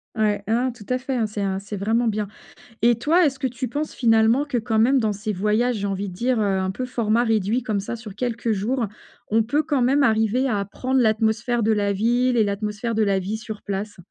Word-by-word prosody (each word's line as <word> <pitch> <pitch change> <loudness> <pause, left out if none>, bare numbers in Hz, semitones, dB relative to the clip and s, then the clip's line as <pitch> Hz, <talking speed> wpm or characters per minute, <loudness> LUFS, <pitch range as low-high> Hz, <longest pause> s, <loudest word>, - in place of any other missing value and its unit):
Ouais, 210 -2 +1
ah, - - -1
non, 250 +2 +1
tout 225 -4 -14
à 255 - +2
fait, 265 +1 -4
hein, 230 -3 +1
c'est 210 -1 -5
un 190 -1 -1
c'est 200 +1 -7
vraiment 225 +4 +1
bien. 210 -1 -1 0.6
Et 235 0 +5
toi, 330 +8 +3
est-ce 270 -2 -1
que 265 - 0
tu 250 +1 -4
penses 295 +6 -3
finalement 225 +3 +3
que, 280 -4 -1
quand 225 -1 -1
même, 255 +4 +4
dans 215 -2 +1
ces 210 +2 -3
voyages, 215 +5 +1
j'ai 200 - -2
envie 195 +1 -3
de 180 - -8
dire, 245 +5 0
heu, 200 -2 +1
un 190 - -1
peu 255 +7 -4
format 235 -1 +1
réduit 225 +2 +1
comme 215 -4 -1
ça 205 +4 -5
sur 220 -3 -10
quelques 235 0 -2
jours, 225 +4 -1 0.4
on 225 +1 +3
peut 285 +8 0
quand 280 -4 +1
même 275 +3 +3
arriver 225 +3 +2
à 205 -4 0
prendre 255 +6 -1
l'atmosphère 225 +1 +1
de 220 - +3
la 205 -1 +1
ville 240 +5 +1
et 220 - +4
l'atmosphère 210 +3 -2
de 220 - +2
la 200 -2 +2
vie 200 +4 -3
sur 220 -2 -8
place? 205 +1 -4
225 Hz, 240 wpm, -23 LUFS, 210-245 Hz, 0.6 s, Et